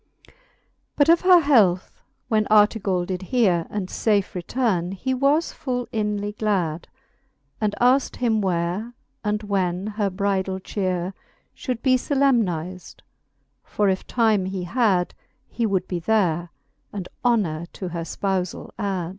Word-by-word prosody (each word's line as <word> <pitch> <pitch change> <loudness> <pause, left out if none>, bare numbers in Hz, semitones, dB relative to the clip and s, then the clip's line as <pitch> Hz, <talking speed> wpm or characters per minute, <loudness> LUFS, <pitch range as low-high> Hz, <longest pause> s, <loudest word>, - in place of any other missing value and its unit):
But 290 +1 +3
of 335 0 +6
her 365 -2 +7
health 210 - +3 0.3
when 215 -2 +1
Artegall 205 -4 +3
did 185 0 -4
heare, 185 -6 +1
And 205 -3 -3
fafe 205 0 0
returne, 185 -1 -1
he 260 +7 -2
was 280 +5 +2
full 245 -2 -3
inly 210 -2 -1
glad, 190 -7 -1 0.7
And 210 -1 0
aikt 255 +3 +3
him 225 -3 +1
where, 185 +5 -2 0.3
and 210 0 -1
when 190 -2 -1
her 210 -1 -1
bridale 190 -1 -1
cheare 185 -2 -2 0.4
Should 250 -3 -4
be 255 -1 +4
iolemniz'd: 215 - 0 0.6
for 205 -1 0
if 190 0 -2
time 220 -5 +2
he 190 -1 -4
had, 190 -3 +1 0.3
He 230 -2 -1
would 190 -3 -1
be 180 - -2
there, 175 -3 +1 0.4
and 195 -3 -5 0.2
honor 180 -10 +1
to 185 - -5
her 170 -1 -4
Ipoufall 185 +1 -3
ad. 190 -4 -2
200 Hz, 135 wpm, -23 LUFS, 180-230 Hz, 0.7 s, her